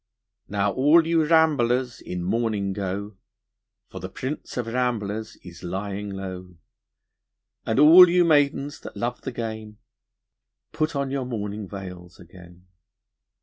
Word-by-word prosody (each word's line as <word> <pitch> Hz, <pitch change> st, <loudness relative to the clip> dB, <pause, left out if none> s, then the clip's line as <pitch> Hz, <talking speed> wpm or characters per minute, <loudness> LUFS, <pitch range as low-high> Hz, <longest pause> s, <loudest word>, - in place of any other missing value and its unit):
Now 100 Hz, 0 st, 0 dB
all 150 Hz, +7 st, +4 dB
you 165 Hz, -1 st, +2 dB
ramblers 130 Hz, -7 st, +2 dB
in 90 Hz, -1 st, -5 dB
mourning 105 Hz, -1 st, -1 dB
go, 100 Hz, +1 st, -5 dB, 0.7 s
For -, -, -9 dB
the -, -, -6 dB
prince 130 Hz, +1 st, -6 dB
of 120 Hz, -, -1 dB
ramblers 115 Hz, -3 st, -2 dB
is 90 Hz, -1 st, -12 dB
lying 100 Hz, +3 st, -4 dB
low, 95 Hz, -2 st, -7 dB, 1.1 s
And 110 Hz, -, 0 dB
all 165 Hz, +5 st, +9 dB
you 175 Hz, 0 st, +4 dB
maidens 145 Hz, -2 st, +2 dB
that -, -, -10 dB
love 120 Hz, +3 st, -3 dB
the 135 Hz, -, -5 dB
game, 110 Hz, -2 st, -6 dB, 0.9 s
Put 155 Hz, 0 st, -2 dB
on 140 Hz, -1 st, -2 dB
your 135 Hz, -2 st, -2 dB
mourning 105 Hz, -4 st, -5 dB
veils 90 Hz, -3 st, -9 dB
again. 90 Hz, 0 st, -16 dB
110 Hz, 130 wpm, -24 LUFS, 95-135 Hz, 1.1 s, all